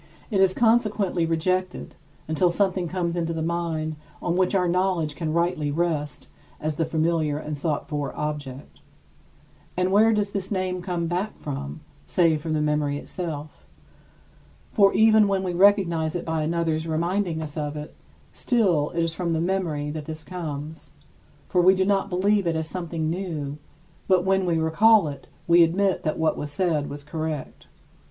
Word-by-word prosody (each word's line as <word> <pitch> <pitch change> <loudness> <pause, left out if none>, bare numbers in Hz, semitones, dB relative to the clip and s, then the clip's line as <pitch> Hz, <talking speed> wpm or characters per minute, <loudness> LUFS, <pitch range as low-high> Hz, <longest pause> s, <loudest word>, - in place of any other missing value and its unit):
It 195 -2 +2
is 190 -1 +4
consequently 215 -7 +2
rejected, 185 +3 -1 0.3
until 160 +3 +2
something 185 0 0
comes 170 0 -2
into 165 -1 -1
the 160 -1 -3
mind 160 -2 -2 0.2
on 175 - -1
which 185 +1 +2
our 180 -2 +2
knowledge 175 -3 0
can 160 +1 -3
rightly 170 -2 0
rest 150 -2 -2 0.3
as 155 0 -2
the 165 - +1
familiar 160 -2 0
and 150 0 -4
sought 145 +1 -2
for 145 -2 -3
object. 145 -3 -5 1.0
And 180 +1 +1
where 215 +3 +5
does 210 -2 0
this 195 -2 -3
name 185 -2 -2
come 175 -2 -2
back 180 +5 -2
from, 75 - -6 0.3
save 160 - +2
from 160 0 -3
the 150 -1 +1
memory 150 -1 0
itself? 155 -2 -6 1.0
For 200 -3 +5
even 220 -1 +6
when 195 -1 0
we 180 -2 -2
recognize 175 -4 +3
it 175 - -3
by 160 -1 -1
another's 160 0 -1
reminding 170 +2 -1
us 155 -2 -6
of 150 -1 -3
it, 150 0 -7 0.4
still 185 - +1
it 170 - +1
is 165 -1 0
from 170 -1 -2
the 160 - 0
memory 165 -5 -1
that 155 -1 -6
this 160 0 -7
comes, 160 -3 -6 0.6
for 180 - +2
we 185 +2 +6
do 190 0 +1
not 200 0 +1
believe 195 +1 +2
it 165 - +1
as 160 0 -2
something 165 -3 -3
new; 155 -5 -4 0.5
but 185 -1 +3
when 190 -1 +2
we 170 -2 +2
recall 185 +5 +4
it, 140 -2 -8 0.2
we 170 +1 +6
admit 185 +4 +2
that 155 - -2
what 160 -1 +1
was 145 - -4
said 150 -2 0
was 145 0 -7
correct. 155 -1 -5
170 Hz, 170 wpm, -25 LUFS, 155-185 Hz, 1.0 s, even